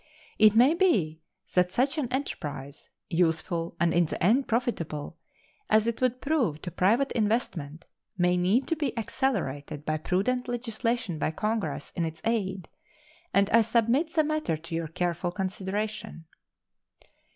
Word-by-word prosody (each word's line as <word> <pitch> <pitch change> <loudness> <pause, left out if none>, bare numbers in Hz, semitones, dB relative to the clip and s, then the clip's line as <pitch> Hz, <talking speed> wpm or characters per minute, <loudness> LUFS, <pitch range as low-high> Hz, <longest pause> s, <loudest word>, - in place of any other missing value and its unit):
It 215 0 +7
may 250 +7 +6
be 200 - +2 0.3
that 180 0 +3
such 275 - +1
an 255 -4 -2
enterprise, 145 - -5 0.2
useful, 165 0 0
and 170 -1 +2
in 175 -1 +3
the - - -4
end 240 +9 +3
profitable, 220 - -2 0.5
as 215 0 +4
it 235 +1 -2
would 255 0 +1
prove 260 - 0
to 175 - -4
private 230 - +2
investment, 190 - -1 0.3
may 180 0 +3
need 190 +9 +2
to 330 - +2
be 285 -6 -2
accelerated 160 - -2
by 155 0 0
prudent 250 +11 0
legislation 230 -6 -2
by - - +1
Congress 160 -5 -3
in 170 - 0
its 160 -1 -4
aid, 195 -6 -1 0.6
and 200 0 +4
I 230 - +7
submit 235 +8 +2
the 320 -3 +3
matter 305 - -1
to 165 +2 -10
your 165 0 -1
careful 175 +1 -2
consideration. 195 +1 -4
200 Hz, 145 wpm, -28 LUFS, 165-245 Hz, 0.6 s, It